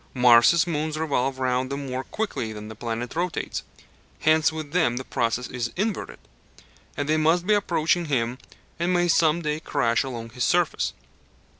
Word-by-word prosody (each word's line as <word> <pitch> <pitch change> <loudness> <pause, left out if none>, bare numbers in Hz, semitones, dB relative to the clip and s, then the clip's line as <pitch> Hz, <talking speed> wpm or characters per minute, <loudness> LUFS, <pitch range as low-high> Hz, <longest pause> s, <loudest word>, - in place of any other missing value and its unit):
Mars' 125 +7 +6
moons 155 -2 -2
revolve 135 -4 0
round 130 0 0
him 140 0 -4
more 130 0 -3
quickly 205 - -3
than 105 0 -8
the 110 - -8
planet 115 +3 -4
rotates: 175 +1 -2 0.6
hence 155 0 +4
with 155 -2 -6
them 160 -8 +2
the 130 - -3
process 120 0 -1
is 120 -2 -4
inverted, 205 +2 -2 0.8
and 145 - -2
they 155 +1 +2
must 165 +3 +2
be 210 - +3
approaching 175 -3 +1
him 125 -4 -1 0.4
and 170 +2 +1
may 175 0 +2
some 165 0 +3
day 150 0 -1
crash 115 -6 +1
along 115 -4 -6
his 125 +1 -3
surface. 175 +1 +1
145 Hz, 165 wpm, -25 LUFS, 125-165 Hz, 0.8 s, Mars